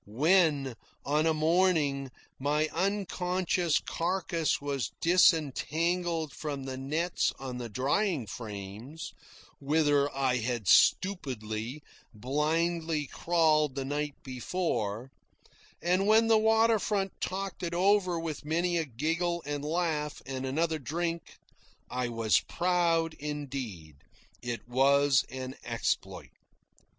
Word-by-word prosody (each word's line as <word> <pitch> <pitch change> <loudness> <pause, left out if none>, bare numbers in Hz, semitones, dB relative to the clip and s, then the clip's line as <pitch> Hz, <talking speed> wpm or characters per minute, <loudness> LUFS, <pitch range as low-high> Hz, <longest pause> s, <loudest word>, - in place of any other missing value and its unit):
When, 145 - +3 0.3
on 150 +3 +2
a 160 - +3
morning, 155 -4 +2 0.3
my 150 +3 +1
unconscious 180 -2 0
carcass 170 -3 -1
was 140 -6 -2
disentangled 165 0 +2
from 145 -3 -5
the 130 -1 -5
nets 155 +7 0
on 130 -2 -6
the 120 -1 -5
drying 140 - 0
frames, 105 +7 -7 0.5
whither 145 -1 +2
I 130 -2 +1
had 120 -3 -2
stupidly, 125 - +2 0.3
blindly 155 +5 0
crawled 155 -3 +2
the 135 -1 -3
night 145 +1 -2
before; 130 - -3 0.7
and 185 +3 +2
when 220 +1 +6
the 225 -1 +5
water 220 0 +4
front 195 -2 -1
talked 195 +1 -3
it 170 -1 -3
over 185 -1 +3
with 160 -3 -5
many 170 +3 0
a 165 - 0
giggle 165 +7 -1
and 145 0 -3
laugh 155 -2 -1
and 130 0 -4
another 160 +3 0
drink, 165 +3 -4 0.5
I 125 -1 -1
was 115 -2 +2
proud 170 -2 +1
indeed. 130 - -5 0.4
It 120 -1 -5
was 140 +2 +4
an 130 0 -6
exploit. 115 -2 -2
150 Hz, 110 wpm, -29 LUFS, 130-175 Hz, 0.7 s, when